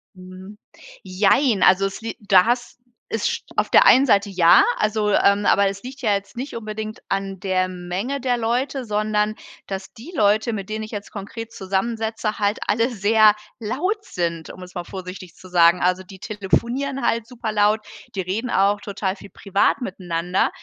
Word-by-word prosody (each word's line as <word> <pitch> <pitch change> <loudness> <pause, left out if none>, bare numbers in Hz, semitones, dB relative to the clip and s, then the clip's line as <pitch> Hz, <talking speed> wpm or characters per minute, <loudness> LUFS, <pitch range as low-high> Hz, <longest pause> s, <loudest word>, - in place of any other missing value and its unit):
Mhm. 185 +2 -12 0.5
Jein. 200 +4 +2
Also, 190 +1 +5
es 195 - -5
lie 225 - -5
da 195 -2 +5
hast 240 +1 -1 0.4
ist 225 - -1
auf - - +1
der - - +6
einen 265 +2 +7
Seite 200 -4 +3
ja, 175 -3 +6
also, 215 0 0
ähm, 200 +1 +3
aber 200 0 +4
es 195 0 -5
liegt 260 +2 -9
ja 215 -5 +2
jetzt 200 +4 -4
nicht 265 +1 -5
unbedingt 215 -1 -6
an 195 -1 -3
der 185 -1 +1
Menge 185 +9 -4
der 245 -1 +1
Leute, 250 +3 -1
sondern, 210 0 0 0.3
dass 195 0 -6
die 295 +11 -12
Leute 215 +1 +2
mit 195 -1 -5
denen 215 0 -3
ich 215 - -12
jetzt 205 -1 -7
konkret 220 +3 -7
zusammensitze 220 +3 -2
halt 205 +1 0
alle 230 +3 +2
sehr 215 -1 +4 0.2
laut 360 - -2
sind, 170 -2 -3
um 185 - -10
es 180 - -13
mal 175 -1 -4
vorsichtig 185 -2 -9
zu 185 - -14
sagen. 175 0 +5
Also, 180 +1 +1
die 190 0 -13
telefonieren 235 +7 -1
halt 230 -1 0
super 240 -3 -5
laut, 210 +1 +2 0.3
die 190 - -1
reden 200 +7 -3
auch 200 0 +2
total 195 -1 -3
viel 200 - -13
privat 200 +6 0
miteinander. 180 -3 -1
205 Hz, 175 wpm, -22 LUFS, 190-225 Hz, 0.5 s, einen